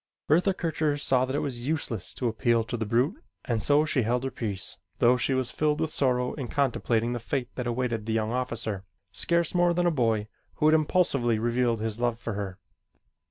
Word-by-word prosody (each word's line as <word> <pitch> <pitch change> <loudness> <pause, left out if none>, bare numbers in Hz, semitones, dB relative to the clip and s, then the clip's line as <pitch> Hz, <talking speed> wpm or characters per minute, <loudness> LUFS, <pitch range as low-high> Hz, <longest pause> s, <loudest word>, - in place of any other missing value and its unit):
Bertha 180 +5 +3
Kircher 155 -4 0
saw 130 -3 +2
that 130 +1 -3
it - - 0
was 125 -2 -3
useless 140 - -2
to 125 - -1
appeal 115 0 +2
to 120 - -4
the 110 -2 -3
brute 130 - +1 0.2
and 115 -3 0
so 145 +6 +3
she 150 -4 +1
held 120 +3 0
her 135 - -2
peace 100 -7 -2 0.2
though 120 +2 +5
she 130 +2 0
was 130 -1 0
filled 150 +2 0
with 160 -1 -1
sorrow 125 -2 +1
in 135 -5 -5
contemplating 120 -3 0
the 120 - -3
fate 125 +2 -3
that 125 -2 -4
awaited 120 -2 -2
the 110 - 0
young 110 0 0
officer, 115 -5 -2 0.3
scarce 170 - 0
more 175 -1 +3
than 175 0 +1
a 175 - +4
boy, 115 -7 +1 0.3
who - - 0
had 155 - +5
impulsively 145 -7 +2
revealed 120 0 +1
his 110 0 -2
love 120 -1 0
for 115 -1 -5
her. 100 -2 -4
125 Hz, 205 wpm, -27 LUFS, 115-145 Hz, 0.3 s, though